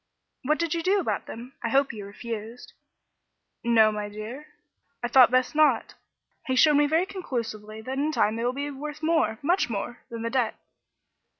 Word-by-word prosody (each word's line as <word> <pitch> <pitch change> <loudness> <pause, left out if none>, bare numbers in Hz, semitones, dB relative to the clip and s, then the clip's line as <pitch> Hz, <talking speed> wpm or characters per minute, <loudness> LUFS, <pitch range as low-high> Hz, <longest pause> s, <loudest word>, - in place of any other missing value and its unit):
"What 300 +3 +1
did 335 -1 -1
you 335 - -1
do 390 +4 +2
about 360 - -2
them? 245 +4 -9
I 230 - -2
hope 270 +1 +2
you 205 -3 -7
refused." 225 +2 -7 0.9
"No, 225 -2 +5
my 210 -1 -4
dear. 220 +8 -8 0.6
I - - +1
thought 255 0 +7
best 255 0 +2
not. 310 0 +3 0.5
He 260 - +1
showed 300 +4 +6
me 295 0 +4
very 325 +4 +2
conclusively 225 - -5
that 260 +4 -4
in 300 +2 +1
time 215 -7 +2
they 230 - -3
will 245 - +1
be 285 +2 -4
worth 295 +2 -7
more 320 -9 +2
much 350 -1 +2
more 235 +3 -4
than 230 -2 -6
the 230 - -2
debt." 250 -4 0
255 Hz, 185 wpm, -26 LUFS, 225-300 Hz, 0.9 s, thought